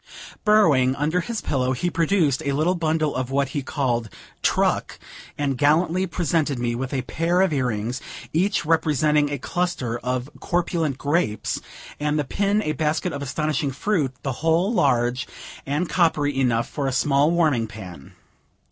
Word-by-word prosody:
Burrowing 155 - +4
under 155 +6 0
his 230 +4 -4
pillow, 130 -2 0
he 155 +8 -2
produced 165 -5 +1
a 140 - -1
little 155 +6 +2
bundle 160 -3 0
of 130 0 -2
what 140 0 0
he 145 +1 -2
called 125 -5 -1 0.3
"truck," - - +1 0.4
and 140 -3 -1
gallantly 170 +5 +3
presented 160 -5 0
me 120 -1 -1
with 130 +2 -3
a 130 -2 -1
pair 165 +8 0
of 190 -4 +2
earrings, 125 -1 -1 0.3
each 180 +1 +1
representing 150 -2 +2
a 145 - -2
cluster 130 -6 -2
of 125 +1 -2
corpulent 170 -5 -1
grapes, 145 -8 -1 0.4
and 150 0 0
the 150 - +1
pin 200 +8 0
a 155 - -1
basket 155 +3 -1
of 140 - -5
astonishing 150 +2 -1
fruit, 145 0 0
the 135 - -1
whole 165 +6 +2
large 125 - +1 0.4
and 150 +6 0
coppery 155 -6 +1
enough 120 -3 +1
for 140 -2 -3
a - - 0
small 140 +3 +3
warming 155 -9 +2
pan. 95 -9 -10
145 Hz, 155 wpm, -23 LUFS, 130-165 Hz, 0.4 s, Burrowing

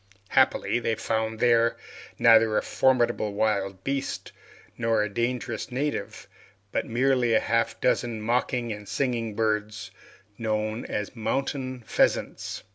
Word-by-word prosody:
Happily, - - +3
they 115 -1 0
found 110 0 -2
there, 115 -1 +3 0.4
neither 115 -2 +5
a - - +1
formidable 120 -5 +2
wild 100 -3 0
beast 135 0 -3 0.4
nor 115 -2 +1
a 105 - -2
dangerous 120 0 -2
native, 145 +4 -3 0.4
but - - -1
merely 125 0 +2
half 115 +1 +2
a - - -30
dozen 120 -2 +1
mocking 120 +1 0
and 105 -1 -10
singing 120 -5 -1
birds, 105 -1 -1 0.5
known 110 0 -2
as 105 +4 -4
mountain 130 +1 -2
pheasants. - - 0
115 Hz, 120 wpm, -26 LUFS, 110-125 Hz, 0.5 s, neither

